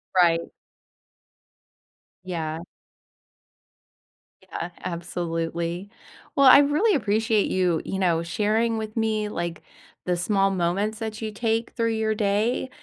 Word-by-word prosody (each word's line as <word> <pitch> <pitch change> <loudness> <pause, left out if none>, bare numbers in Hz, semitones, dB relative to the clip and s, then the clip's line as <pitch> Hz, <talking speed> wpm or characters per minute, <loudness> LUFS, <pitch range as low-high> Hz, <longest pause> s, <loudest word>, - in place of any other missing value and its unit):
Right. 170 -2 +4 1.8
Yeah. 165 -3 -3 1.8
Yeah, 180 -2 -6
absolutely. 170 +1 -3 0.5
Well, 275 -1 +5
I 260 - +10
really 310 +8 +3
appreciate 220 -3 +1
you, 180 -3 +1
you 190 - -3
know, 170 -3 +2
sharing 220 +6 0
with 215 0 -5
me, 220 -2 0
like, 170 -3 -4 0.4
the 180 - +1
small 195 +2 +1
moments 195 +4 -1
that 220 0 -5
you 215 -1 -3
take 225 +1 -1
through 230 -1 0
your 220 0 0
day, 215 +5 0
205 Hz, 110 wpm, -25 LUFS, 175-220 Hz, 1.8 s, I